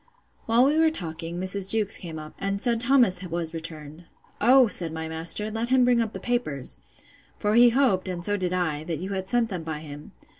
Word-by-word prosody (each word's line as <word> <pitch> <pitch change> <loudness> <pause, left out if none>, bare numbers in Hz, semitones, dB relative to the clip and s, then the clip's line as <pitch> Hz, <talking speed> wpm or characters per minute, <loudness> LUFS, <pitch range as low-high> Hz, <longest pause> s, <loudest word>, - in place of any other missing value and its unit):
While 230 +3 +4
we 300 +3 +2
were 320 0 +4
talking, 170 - -6
Mrs. 190 +1 +1
Jewkes 215 -1 +4
came 165 -3 -8
up, 155 0 -9
and 195 0 -2
said 235 +1 0
Thomas 240 -7 +3
was 170 -2 -4
returned. 160 0 -9 0.4
O, 255 +4 +6
said 175 -7 +1
my 160 0 -5
master, 165 +7 -1
let 225 +2 -3
him 255 -1 +4
bring 245 -1 +3
up 220 -1 -3
the - - -6
papers: 195 - -2 0.6
for 210 0 -1
he 240 +1 +7
hoped, 235 -7 +1
and 175 -2 -4
so 205 - 0
did 185 -3 -2
I, 165 -5 -1
that 165 -2 -3
you 185 +5 -6
had 190 -1 -4
sent 240 0 +1
them 185 -4 -4
by 160 -2 -6
him. 145 -1 -11
190 Hz, 215 wpm, -25 LUFS, 165-230 Hz, 0.6 s, he